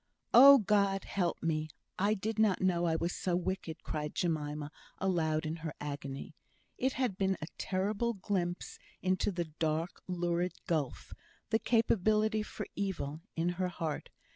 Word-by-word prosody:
"Oh, 275 +3 +11
God! 200 -3 +2
help 180 -4 -1
me! 155 -1 0 0.3
I 205 +3 +3
did 215 +2 -3
not 215 -4 +4
know 175 -2 +2
I 165 -1 +2
was 170 +2 -1
so 180 -2 -1
wicked," 180 -2 -3
cried 150 -1 -4
Jemima 150 -3 -1 0.3
aloud 160 -5 +1
in 155 +2 -2
her 160 -2 -6
agony. 145 +3 -5 0.4
It 260 +1 0
had 245 -8 -1
been 190 -1 +2
a 155 - -4
terrible 205 +5 0
glimpse 185 -3 -2 0.2
into 185 +2 +1
the 175 -2 -2
dark, 160 +2 -2
lurid 175 0 0
gulf 155 -6 -2 0.4
the 220 - +4
capability 220 -1 +2
for 210 - -5
evil, 165 -6 -3
in 165 +1 +1
her 185 - +2
heart. 165 -4 -4
180 Hz, 150 wpm, -32 LUFS, 160-200 Hz, 0.4 s, Oh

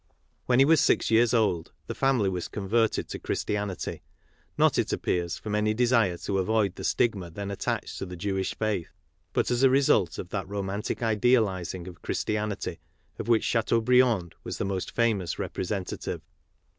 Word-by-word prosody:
When 125 - +4
he 135 - +7
was 160 +1 +5
six - - +2
years 115 +1 +5
old, 105 -8 +1
the - - -4
family 135 -7 +2
was 90 -2 -2
converted 110 +2 0
to - - -5
Christianity, 100 -3 -3 0.6
not, - - +4
it - - 0
appears, 85 -1 -1
from 105 - -5
any 105 +1 +1
desire 115 -7 +3
to 95 +2 -2
avoid 105 0 +1
the - - -9
stigma 100 -7 0
then 100 +4 -5
attached 100 - -3
to 95 - -4
the 90 - -7
Jewish 95 +2 -2
faith, 105 -6 -1 0.4
but' - - 0
as 120 0 +1
a 135 - +6
result 130 - +3
of 90 - -6
that 95 -1 -4
romantic 100 +3 -3
idealizing 105 -6 +1
of 85 -4 -11
Christianity 105 -1 -2 0.4
of - - -4
which 115 -2 +3
Chateau 115 0 +2
briand 115 -7 +3
was - - -5
the - - -2
most 95 -2 -2
famous 110 -7 0
representative. 95 -1 -4
105 Hz, 170 wpm, -27 LUFS, 95-115 Hz, 0.6 s, he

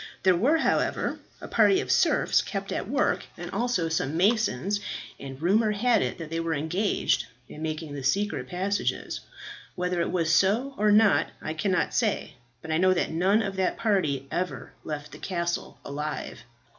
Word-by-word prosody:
There 185 -1 +5
were, 265 - +3
however, - - 0 0.2
a - - -7
party 380 - +4
of - - -2
serfs - - +3
kept - - -5
at - - -3
work, - - +1
and - - -7
also 235 -9 0
some 160 -1 -1
masons, 205 - +2 0.4
and 135 -1 -8
rumour 210 +6 +3
had 230 +3 +3
it - - -2
that 165 -2 -8
they 165 - -1
were 165 -1 -1
engaged 175 +8 0 0.2
in 150 - -10
making 155 -1 -4
the 140 -2 -6
secret 135 -2 0
passages. 195 +6 -2 0.6
Whether 180 -1 -1
it - - -1
was 165 -2 +1
so 220 +10 +3
or 210 -3 +3
not 210 0 +5
I 155 - -4
cannot 180 +3 0
say, 215 -8 0 0.3
but 160 - -5
I 155 - +2
know 185 +1 +4
that 175 - 0
none 190 +7 +3
of 195 -1 -3
that 190 -1 0
party 180 - 0
ever 180 +1 -3
left 150 -1 -5
the - - -11
castle 170 -2 -3
alive. 150 +2 -4
180 Hz, 175 wpm, -27 LUFS, 160-205 Hz, 0.6 s, There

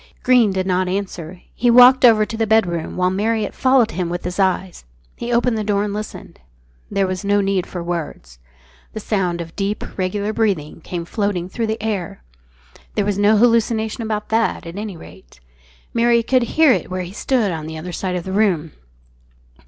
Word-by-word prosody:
Greene 245 -5 +4
did 190 -1 -1
not 185 0 0
answer. 180 -2 -5
He 245 - +1
walked 250 +2 +7
over 220 -3 +6
to 225 - -6
the 225 0 -1
bedroom, 180 -8 +1
while 180 0 +2
Marriott 215 +2 -1
followed 255 -4 +3
him 180 -2 -3
with 175 0 -4
his 180 +2 -5
eyes. 190 -1 0 0.3
He 235 - -5
opened 240 -1 +1
the - - -2
door, 205 -1 0
and 205 -1 -3
listened. 215 +1 -7 0.5
There 195 -1 +1
was 185 +1 -4
no 205 0 +2
need 195 -2 0
for 175 -2 -6
words. 155 - -5 0.5
The 220 - -5
sound 185 -5 -1
of 165 -1 -9
deep, 200 +1 -2 0.2
regular 205 +3 -1
breathing 190 -9 -1
came 170 +1 -5
floating 190 -2 -2
through 230 +2 -2
the 220 0 -3
air. 195 - -3 0.7
There 205 - +1
was 205 -1 -1
no 210 +1 +4
hallucination 230 0 +2
about 215 -2 -3
that, 225 -4 0
at 165 +1 -8
any 205 -3 -6
rate. 85 - -15 0.5
Marriott 235 0 +3
could 255 -2 +3
hear 315 -3 +6
it - - 0
where 185 0 -3
he 180 +2 -9
stood 225 -3 0
on 160 -2 -5
the 160 0 -6
other 175 +3 -6
side 180 +2 -3
of 180 - -3
the 190 - -6
room. 185 -7 +1
200 Hz, 190 wpm, -20 LUFS, 180-220 Hz, 0.7 s, walked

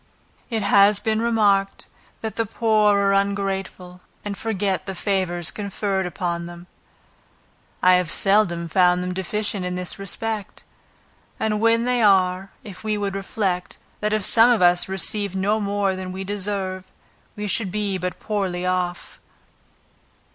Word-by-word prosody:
It 225 -3 -1
has 200 0 +5
been 220 +1 0
remarked, 205 -4 +1 0.4
that 220 -2 -4
the 225 -1 -1
poor 215 -2 +3
are 200 0 +2
ungrateful, 195 -2 -2 0.2
and 205 -1 -3
forget 200 -4 -2
the 190 - -4
favors 180 -3 -1
conferred 200 -2 -2
upon 170 -1 -3
them. 175 0 -11 1.2
I 185 - +7
have 180 -3 -1
seldom 185 -3 +2
found 180 +1 +3
them 180 0 -3
deficient 200 +1 -2
in 180 0 -3
this 180 +1 -4
respect; 210 +1 -4 0.8
and 215 -1 0
when 230 +1 +3
they 250 -1 +1
are, 190 -2 +3
if 200 -3 -10
we 215 -1 -1
would 200 -1 -2
reflect, 195 -2 -3 0.2
that 210 0 -1
if 215 -2 +1
some 230 +1 +6
of 240 -3 +3
us 175 0 +3
received 195 +1 0
no 205 +3 +1
more 200 -2 0
than 185 0 -6
we 190 +1 -5
deserve, 195 -2 -4 0.4
we 210 0 -4
should 205 0 0
be 200 -1 -2
but 180 +1 -4
poorly 190 -4 -2
off. 180 -1 -2
195 Hz, 145 wpm, -22 LUFS, 185-210 Hz, 1.2 s, I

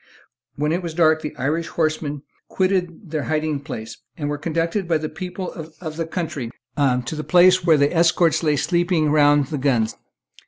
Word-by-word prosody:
When 150 +2 0
it 175 +3 0
was 170 -3 -6
dark 160 -2 +4
the 150 - -6
Irish 155 +5 -1
horsemen 155 -3 -2 0.2
quitted 185 -2 -1
their 155 -2 -1
hiding 155 -2 -1
place, 115 -6 -7 0.2
and 145 -3 -3
were 145 - -2
conducted 165 +4 -1
by 165 -2 +2
the 155 0 -4
people 180 +2 -6
of 160 0 -8
the 165 0 -3
country 160 -8 -4 0.3
to 130 0 +1
the 155 - -4
place 180 +1 +5
where 165 -3 +5
the 145 +4 +2
escort 165 0 +3
lay 150 -3 +2
sleeping 170 0 +1
round 145 -2 +4
the 150 - -3
guns. 120 -5 +1
155 Hz, 180 wpm, -22 LUFS, 145-170 Hz, 0.3 s, place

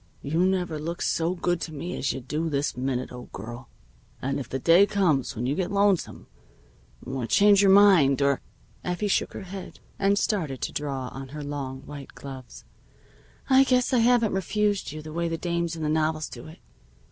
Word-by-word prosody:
"You 160 +5 +1
never 180 -4 -1
looked 170 +3 -4
so 170 +2 0
good 175 -1 -1
to 160 - -4
me 165 +4 -5
as 135 - -1
you 135 - -5
do 150 +6 -2
this 145 -1 -1
minute, 130 0 -2
old 125 0 -10
girl. 120 +5 -8 0.5
And 135 +2 -2
if 130 - -7
the 135 - -2
day 170 +8 +5
comes 175 -11 +1
when 120 +2 -3
you 135 - +1
get 180 +4 -2
lonesome 200 -3 +1 0.8
or 130 -2 -3
change 200 - +5
your 200 - +5
mind 190 -9 +6
or 140 -1 +2 0.2
" - - -32
Effie 180 +4 -2
shook 200 - 0
her - - -7
head, 190 0 -9 0.2
and 200 +1 +3
started 160 - -1
to - - -2
draw 135 -3 -3
on 135 0 -8
her 150 +2 -7
long 135 -2 -5
white 140 -1 -10
gloves. 130 -3 -10 0.8
"I 265 0 +6
guess 255 0 +2
I 250 - +4
haven't 235 -2 +3
refused 205 0 0
you 155 0 -7
the 155 0 -8
way 170 +1 -1
the 165 0 -2
dames 170 -1 -2
in 160 - -5
the - - 0
novels 155 0 0
do - - -10
it. 160 +3 -12
160 Hz, 200 wpm, -26 LUFS, 135-190 Hz, 0.8 s, mind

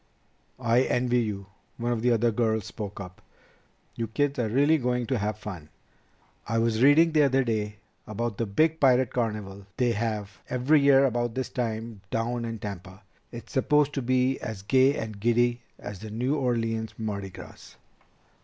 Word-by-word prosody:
"I 120 0 +3
envy 125 -1 +1
you," 100 -3 -4 0.3
one 120 0 -1
of 115 -2 -1
the 125 - +2
other 115 0 +3
girls 110 -2 0
spoke 105 -3 -7
up. 90 -2 -9 0.7
"You 115 - -3
kids 140 +4 -1
are 120 - +1
really 145 +7 +3
going 125 -1 0
to 130 -1 -1
have 105 +1 -2
fun! 90 -8 -8 0.8
I 115 +2 0
was 115 0 +1
reading 150 +5 +6
the 155 -1 +4
other 135 -1 +3
day 110 -3 -2 0.3
about 110 0 -3
the 115 - 0
big 160 +10 +2
pirate 130 -3 +3
carnival 105 -5 -3
they 125 -2 +2
have 105 -3 -3
every 130 +4 +3
year 140 -1 +6
about 120 -2 -1
this 130 0 -2
time 115 -3 -4
down 115 +1 -2
in 115 -1 -4
Tampa. 95 -1 -8 0.3
It's 120 +4 -10
supposed 145 +1 +2
to 135 - -2
be 130 +1 +1
as 105 -3 -6
gay 130 +5 +4
and 110 -2 -5
giddy 120 +2 +2 0.2
as 100 -3 -8
the 110 +2 -8
New 125 +6 -1
Orleans 115 -5 -1
Mardi 100 -3 -4
Gras." - - -12
115 Hz, 175 wpm, -27 LUFS, 110-130 Hz, 0.8 s, reading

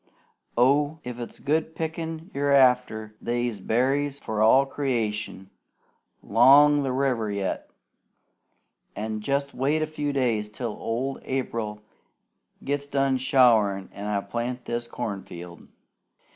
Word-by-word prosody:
Oh! 145 +5 +3
if 125 -1 -6
it's 120 - -7
good 160 +2 -1
pickin' 160 +2 -5
you're 140 +1 0
after, 125 -5 +3
they's 120 -2 -2
berries 135 +7 0
for 110 -5 -3
all 130 +5 +6
creation 110 -8 -3 0.7
'long 145 +5 +6
the 135 -2 -1
river 125 -5 0
yet; 100 -2 -3 1.3
an' 110 0 -3
jest 140 +4 -1
wait 145 +5 +1
a - - +1
few 150 -2 -3
days 115 -6 0
till 115 +2 -4
old 125 +6 -3
April 115 -5 -3 0.8
gets 140 0 -2
done 135 -1 +1
showerin' 110 -7 +3
an' 100 +1 -6
I 105 -1 0
plow 120 +5 -3
this 120 0 -3
corn 110 -5 -4
field!" 85 0 -11
125 Hz, 125 wpm, -25 LUFS, 110-140 Hz, 1.3 s, all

